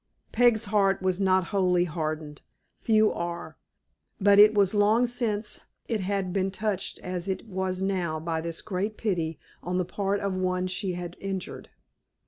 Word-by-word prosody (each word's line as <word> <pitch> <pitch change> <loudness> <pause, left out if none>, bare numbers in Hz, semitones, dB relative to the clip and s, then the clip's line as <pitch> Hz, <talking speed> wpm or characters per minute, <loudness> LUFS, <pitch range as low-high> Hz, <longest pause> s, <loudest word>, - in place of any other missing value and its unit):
Peg's 240 -2 +4
heart 200 -2 +2
was 185 0 +1
not 190 -1 +3
wholly 180 -3 +3
hardened. 155 -3 -4 0.4
Few 215 -1 +3
are. 170 0 -5 0.6
But 200 0 +5
it 210 +1 +8
was 200 -1 +3
long 215 +4 +4
since 230 -3 -1 0.3
it 225 -4 -1
had 190 -1 -2
been 195 -1 +1
touched 195 0 -3
as 180 0 -4
it 190 +2 -3
was 190 -2 -2
now 180 -5 -1
by 160 0 -2
this 165 0 -3
great 205 +2 -3
pity 170 -7 -1 0.2
on 180 +1 -2
the 180 - 0
part 200 +2 -1
of 195 -1 -2
one 185 0 0
she 185 +1 -2
had 175 -1 -6
injured. 195 -2 -5
190 Hz, 160 wpm, -27 LUFS, 180-205 Hz, 0.6 s, it